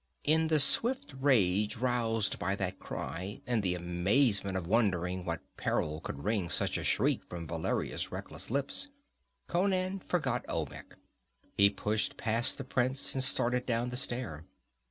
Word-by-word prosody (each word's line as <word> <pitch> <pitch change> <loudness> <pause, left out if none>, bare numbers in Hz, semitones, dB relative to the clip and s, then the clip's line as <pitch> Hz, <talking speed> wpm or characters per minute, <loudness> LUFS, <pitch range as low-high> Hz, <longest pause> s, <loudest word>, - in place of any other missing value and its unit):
In 160 +2 +3
the 155 -1 +3
swift 230 - +4
rage 105 -5 +3
roused 115 -4 0
by 95 +3 0
that 95 -1 -3
cry, 95 +3 -5
and 120 -3 +1
the 90 -2 0
amazement 95 +4 +1
of 90 - -4
wondering 90 -3 +1
what 85 -3 -3
peril 75 0 -1
could 70 - -6
wring 100 -4 0
such - - 0
a - - -5
shriek - - +2
from 85 -1 -6
Valeria's 80 +1 -2
reckless - - -7
lips, 140 - -1 0.6
Conan 185 +1 0
forgot 135 -9 -1
Olmec. - - -5 0.6
He 100 0 +6
pushed 105 +1 -1
past 115 +3 +1
the 135 - -5
prince 130 +1 0
and 130 - 0
started 125 -1 +3
down 120 0 0
the - - -3
stair. 120 - -3
115 Hz, 150 wpm, -31 LUFS, 95-130 Hz, 0.6 s, He